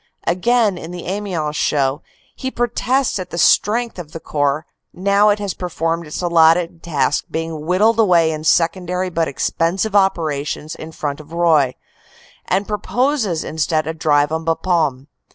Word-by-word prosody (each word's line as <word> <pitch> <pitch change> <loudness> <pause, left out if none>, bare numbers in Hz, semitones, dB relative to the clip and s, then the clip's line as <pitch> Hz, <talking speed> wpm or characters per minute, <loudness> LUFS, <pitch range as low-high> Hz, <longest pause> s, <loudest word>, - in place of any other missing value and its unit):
Again, 205 +2 +2
in 160 - -8
the 175 -1 -7
Amiens 180 -6 -3
show, 140 -1 0 0.3
he 260 - -4
protests 245 0 0
at 185 - -6
the 170 - -6
strength 225 +5 +2
of 160 -2 -9
the 165 - -6
Corps 145 0 -1 0.3
now 200 +3 +3
it 205 - +3
has 205 -2 -3
performed 165 -2 -3
its 150 - -5
allotted 165 0 +3
task 145 -6 0
being 160 -1 -4
whittled 210 +6 +3
away 175 -6 +4
in 155 0 -5
secondary 180 +3 +1
but 165 -1 0
expensive 180 +9 -1
operations 155 -6 0
in 160 - -9
front 145 -2 -4
of 155 +1 -13
Roye; 160 -6 +3 0.7
and 195 +2 0
proposes 215 - 0
instead 155 0 -1
a 160 - -3
drive 150 -2 +2
on 160 0 -2
Bapaume. 160 -5 0
170 Hz, 150 wpm, -19 LUFS, 155-195 Hz, 0.7 s, away